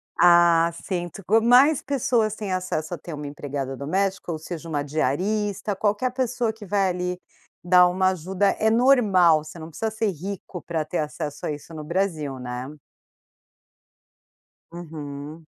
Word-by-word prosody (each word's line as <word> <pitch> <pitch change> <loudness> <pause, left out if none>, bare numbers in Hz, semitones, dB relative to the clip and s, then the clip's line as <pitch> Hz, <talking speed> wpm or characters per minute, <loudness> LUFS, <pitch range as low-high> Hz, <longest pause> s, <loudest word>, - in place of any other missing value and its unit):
Ah, 170 -1 +5
sim, 175 0 -4
toco 200 +6 +1
mais 255 +6 +5
pessoas 235 -5 0
têm 205 -3 -5
acesso 180 -3 -2
a - - -3
ter 165 +2 -9
uma 150 0 -6 0.5
doméstica, 190 +5 -1
ou 155 - -4
seja, 165 0 -7
uma 145 -2 -1
diarista, 195 +9 -1
qualquer 210 +5 0
pessoa 245 -2 -1
que 220 -2 -11
vá 195 0 +1
ali, 180 0 -2 0.4
dar 180 0 +6
uma 185 +1 +2
ajuda, 190 +3 0
é 220 - +3
normal, 210 - +4
você 165 +2 -11
não 160 - -8
precisa 220 +8 -3
ser 220 -1 0
rico 185 +1 -7
para 165 -1 -2
ter 175 - -3
acesso 150 -1 -4
a - - -1
isso 150 +3 -8
no 155 - -6
Brasil, 155 -5 -2
né. 125 +1 -5 2.0
Uhum. 155 -2 -8
180 Hz, 150 wpm, -24 LUFS, 155-205 Hz, 2.0 s, dar